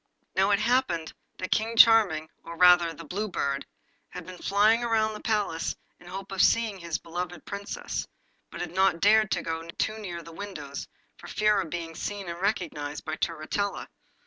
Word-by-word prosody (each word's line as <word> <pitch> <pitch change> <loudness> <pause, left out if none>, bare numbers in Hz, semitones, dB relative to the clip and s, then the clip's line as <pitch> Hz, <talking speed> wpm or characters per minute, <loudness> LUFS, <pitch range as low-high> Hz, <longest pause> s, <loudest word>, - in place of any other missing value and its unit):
Now 190 +1 +3
it 200 - +4
happened 200 -10 +1 0.2
that 185 - -5
King 225 +1 0
Charming, 210 -10 +6 0.2
or 170 0 -8
rather 175 -1 +6
the 165 +1 -10
Blue 200 +8 -3
Bird, 140 -7 -2 0.4
had - - -8
been 185 -1 -10
flying 210 +4 +3
round 220 -2 +1
the - - -7
palace 205 -7 -1 0.2
in 175 - -16
the - - -10
hope 195 +1 -7
of 195 - +1
seeing 225 -4 +3
his 170 -2 -3
beloved 175 0 -6
Princess, 200 0 -4 0.4
but - - -7
had 175 -1 -5
not 190 -2 +3
dared 215 +2 +5
to - - -1
go 165 0 -3 0.2
too 220 0 -1
near 175 -5 -6
the 165 - -11
windows 160 -7 -7 0.3
for - - -12
fear 210 -1 +2
of 175 - -6
being 165 0 -5
seen 200 +3 -5
and 170 +1 -6
recognised 155 -8 -2
by 155 - -2
Turritella. 170 +6 -2
185 Hz, 185 wpm, -27 LUFS, 165-210 Hz, 0.4 s, Charming